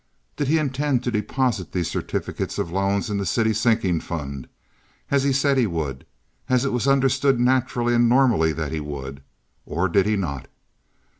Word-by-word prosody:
Did 145 Hz, -, -2 dB
he 160 Hz, +4 st, +3 dB
intend 140 Hz, -3 st, 0 dB
to 125 Hz, -, -1 dB
deposit 115 Hz, -2 st, -1 dB
these 90 Hz, -3 st, -1 dB
certificates -, -, -3 dB
of 85 Hz, -, -2 dB
loans 100 Hz, +4 st, 0 dB
in 100 Hz, -, -1 dB
the -, -, -1 dB
city 110 Hz, +4 st, +1 dB
sinking 110 Hz, -6 st, +1 dB
fund, 70 Hz, -5 st, -6 dB, 0.6 s
as 140 Hz, -1 st, +3 dB
he 140 Hz, +1 st, +1 dB
said 135 Hz, 0 st, +2 dB
he 120 Hz, -, +3 dB
would—as 80 Hz, -, -4 dB
it 135 Hz, -, -1 dB
was 125 Hz, +2 st, 0 dB
understood 135 Hz, -1 st, +3 dB
naturally 125 Hz, -1 st, +1 dB
and 120 Hz, 0 st, +4 dB
normally 120 Hz, -11 st, +4 dB
that 80 Hz, -2 st, -4 dB
he 80 Hz, -, -2 dB
would—or 70 Hz, +4 st, -6 dB
did 100 Hz, -1 st, +3 dB
he 105 Hz, -, +2 dB
not? 75 Hz, -10 st, -3 dB
110 Hz, 165 wpm, -23 LUFS, 80-130 Hz, 0.6 s, and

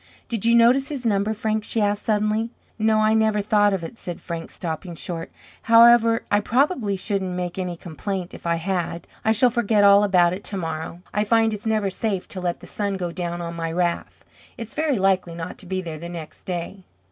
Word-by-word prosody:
"Did 230 Hz, -3 st, -3 dB
you 235 Hz, 0 st, +5 dB
notice 250 Hz, +4 st, +5 dB
his 275 Hz, -5 st, -5 dB
number, 205 Hz, -1 st, +1 dB
Frank?" 220 Hz, 0 st, -1 dB
she 225 Hz, -, -2 dB
asked, 205 Hz, -1 st, 0 dB
suddenly. 215 Hz, +1 st, +1 dB, 0.3 s
"No, 215 Hz, 0 st, +3 dB
I 215 Hz, 0 st, +3 dB
never 220 Hz, -1 st, +2 dB
thought 205 Hz, 0 st, +3 dB
of 190 Hz, -3 st, -2 dB
it" 165 Hz, +8 st, -8 dB
said 175 Hz, -2 st, -5 dB
Frank, 170 Hz, -1 st, -6 dB
stopping 170 Hz, +1 st, -5 dB
short. 165 Hz, 0 st, -5 dB, 0.3 s
"However, 230 Hz, 0 st, +6 dB
I 205 Hz, -, +4 dB
probably 245 Hz, -, +1 dB
shouldn't 190 Hz, -1 st, -2 dB
make 180 Hz, 0 st, -4 dB
any 180 Hz, -2 st, -3 dB
complaint 180 Hz, +2 st, -5 dB
if -, -, -8 dB
I 170 Hz, -, +2 dB
had. 170 Hz, -1 st, -3 dB, 0.2 s
I 220 Hz, -, +3 dB
shall 235 Hz, +3 st, +4 dB
forget 225 Hz, -3 st, +2 dB
all 200 Hz, 0 st, +7 dB
about 180 Hz, -4 st, +4 dB
it 190 Hz, -, -6 dB
tomorrow. 165 Hz, -2 st, -5 dB
I 210 Hz, -, +1 dB
find 225 Hz, +1 st, +3 dB
it's 210 Hz, +1 st, -5 dB
never 215 Hz, -3 st, +1 dB
safe 195 Hz, -2 st, -2 dB
to 185 Hz, -, -6 dB
let 175 Hz, -1 st, -2 dB
the -, -, -11 dB
sun 200 Hz, -2 st, -3 dB
go 175 Hz, -2 st, -3 dB
down 175 Hz, 0 st, -4 dB
on 170 Hz, 0 st, -5 dB
my 165 Hz, -1 st, -3 dB
wrath. 175 Hz, 0 st, -2 dB, 0.3 s
It's 230 Hz, -1 st, -7 dB
very 305 Hz, -4 st, 0 dB
likely 190 Hz, -3 st, +1 dB
not 170 Hz, +1 st, -7 dB
to 185 Hz, -, -11 dB
be 185 Hz, 0 st, -2 dB
there 160 Hz, -3 st, -6 dB
the 170 Hz, +2 st, -7 dB
next 165 Hz, -3 st, -9 dB
day." 180 Hz, +1 st, -5 dB
200 Hz, 210 wpm, -23 LUFS, 175-220 Hz, 0.3 s, all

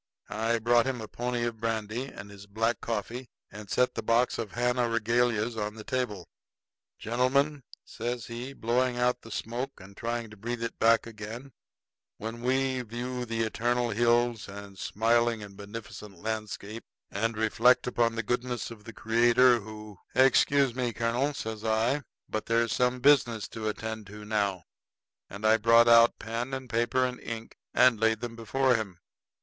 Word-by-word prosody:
I 115 Hz, +3 st, 0 dB
brought 120 Hz, +2 st, +3 dB
him 130 Hz, -2 st, -2 dB
a 110 Hz, -, -6 dB
pony 120 Hz, +1 st, -2 dB
of 115 Hz, -2 st, -4 dB
brandy 115 Hz, +2 st, -2 dB
and 100 Hz, -6 st, -10 dB
his 100 Hz, 0 st, -12 dB
black 115 Hz, +2 st, -1 dB
coffee, 115 Hz, +2 st, -4 dB, 0.2 s
and 105 Hz, -1 st, -10 dB
set 125 Hz, +4 st, +2 dB
the -, -, -3 dB
box 115 Hz, +3 st, +2 dB
of 110 Hz, -4 st, -4 dB
Havana 125 Hz, 0 st, +1 dB
regalias 115 Hz, 0 st, +1 dB
on 105 Hz, 0 st, -3 dB
the 110 Hz, -, -9 dB
table. 105 Hz, -7 st, -3 dB, 0.7 s
"Gentlemen," 135 Hz, +5 st, +1 dB, 0.2 s
says 120 Hz, -1 st, -4 dB
he, 120 Hz, +3 st, -6 dB
blowing 125 Hz, 0 st, 0 dB
out 125 Hz, 0 st, +1 dB
the 115 Hz, -, -12 dB
smoke 120 Hz, +5 st, -4 dB
and 100 Hz, +1 st, -13 dB
trying 115 Hz, 0 st, -3 dB
to -, -, -11 dB
breathe 120 Hz, +3 st, -4 dB
it 115 Hz, -, -5 dB
back 115 Hz, 0 st, +4 dB
again, 115 Hz, +4 st, -8 dB, 0.7 s
"when 115 Hz, +2 st, -6 dB
we 130 Hz, +1 st, +1 dB
view 125 Hz, +2 st, -4 dB
the 115 Hz, -1 st, -1 dB
eternal 120 Hz, +2 st, 0 dB
hills 120 Hz, 0 st, +2 dB
and 100 Hz, 0 st, -9 dB
the 95 Hz, -, -10 dB
smiling 115 Hz, 0 st, +1 dB
and 100 Hz, -1 st, -11 dB
beneficent 105 Hz, -1 st, -9 dB
landscape, 110 Hz, +1 st, -5 dB, 0.3 s
and 115 Hz, +2 st, -1 dB
reflect 115 Hz, +3 st, +4 dB
upon 120 Hz, -2 st, +1 dB
the 115 Hz, -, -2 dB
goodness 120 Hz, 0 st, -2 dB
of 110 Hz, -2 st, -12 dB
the 115 Hz, -, -9 dB
Creator 120 Hz, +2 st, +4 dB
who 105 Hz, -2 st, -10 dB
" -, -, -33 dB
"Excuse 135 Hz, 0 st, +4 dB
me, 125 Hz, -2 st, -2 dB
colonel," 120 Hz, +5 st, 0 dB
says 110 Hz, -3 st, -5 dB
I, 115 Hz, +6 st, +1 dB, 0.3 s
"but 110 Hz, -, -4 dB
there's 115 Hz, 0 st, +2 dB
some 125 Hz, 0 st, +1 dB
business 125 Hz, -6 st, +4 dB
to 110 Hz, -1 st, -3 dB
attend 110 Hz, -1 st, -5 dB
to 105 Hz, +1 st, -10 dB
now"; 100 Hz, -4 st, 0 dB, 0.7 s
and 100 Hz, +2 st, -7 dB
I 110 Hz, +1 st, +6 dB
brought 115 Hz, +2 st, +5 dB
out 115 Hz, 0 st, +7 dB
paper 115 Hz, +2 st, -3 dB
and 130 Hz, -1 st, -7 dB
pen 120 Hz, 0 st, 0 dB
and 130 Hz, -1 st, +1 dB
ink 115 Hz, -1 st, -7 dB, 0.2 s
and 125 Hz, -4 st, +5 dB
laid 110 Hz, 0 st, +2 dB
'em 120 Hz, -1 st, -4 dB
before 130 Hz, +3 st, +1 dB
him. 105 Hz, -6 st, -2 dB
115 Hz, 170 wpm, -28 LUFS, 110-125 Hz, 0.7 s, out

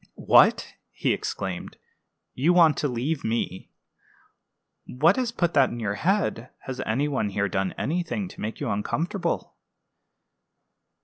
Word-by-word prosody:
"What!" -, -, +4 dB, 0.2 s
he -, -, 0 dB
exclaimed; 95 Hz, -2 st, -5 dB, 0.6 s
"you 155 Hz, +7 st, +2 dB
want 165 Hz, -4 st, +6 dB
to 145 Hz, -, 0 dB
leave 135 Hz, +4 st, -2 dB
me! 110 Hz, -5 st, -3 dB, 1.2 s
What 155 Hz, +9 st, +3 dB
has 250 Hz, -2 st, -1 dB
put 175 Hz, -7 st, 0 dB
that 135 Hz, -3 st, +4 dB
in 120 Hz, -, -6 dB
your 105 Hz, -3 st, -1 dB
head? 165 Hz, -, 0 dB
Has 130 Hz, -1 st, -5 dB
any 130 Hz, +7 st, +1 dB
one 130 Hz, -8 st, -1 dB
here 100 Hz, 0 st, 0 dB
done 95 Hz, -1 st, -1 dB
anything 175 Hz, +5 st, -2 dB
to -, -, -11 dB
make 110 Hz, +1 st, -4 dB
you -, -, -3 dB
uncomfortable?" 165 Hz, -, -2 dB
135 Hz, 135 wpm, -25 LUFS, 110-170 Hz, 1.2 s, want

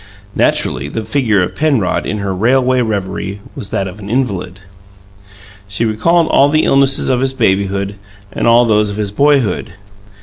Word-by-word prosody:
Naturally, 65 Hz, +2 st, 0 dB
the 110 Hz, +7 st, -4 dB
figure 110 Hz, -4 st, +1 dB
of -, -, -5 dB
Penrod, 135 Hz, -12 st, 0 dB
in 105 Hz, -, -2 dB
her 100 Hz, -2 st, -3 dB
railway 125 Hz, +5 st, +2 dB
reverie, 100 Hz, -2 st, -3 dB, 0.2 s
was 100 Hz, -, -6 dB
that 95 Hz, -, -2 dB
of 95 Hz, +3 st, -10 dB
an 100 Hz, 0 st, -9 dB
invalid. 100 Hz, -7 st, -2 dB, 1.1 s
She 100 Hz, +4 st, -2 dB
recalled 165 Hz, +11 st, +2 dB
all 140 Hz, +1 st, +4 dB
the 155 Hz, +1 st, +2 dB
illnesses 135 Hz, 0 st, +3 dB
of 130 Hz, -2 st, +1 dB
his 135 Hz, 0 st, 0 dB
babyhood 100 Hz, -4 st, 0 dB, 0.4 s
and -, -, -1 dB
all 120 Hz, +1 st, +5 dB
those 105 Hz, -2 st, +2 dB
of 100 Hz, -, -6 dB
his 105 Hz, -2 st, -2 dB
boyhood. 120 Hz, -6 st, +1 dB
110 Hz, 165 wpm, -15 LUFS, 100-130 Hz, 1.1 s, all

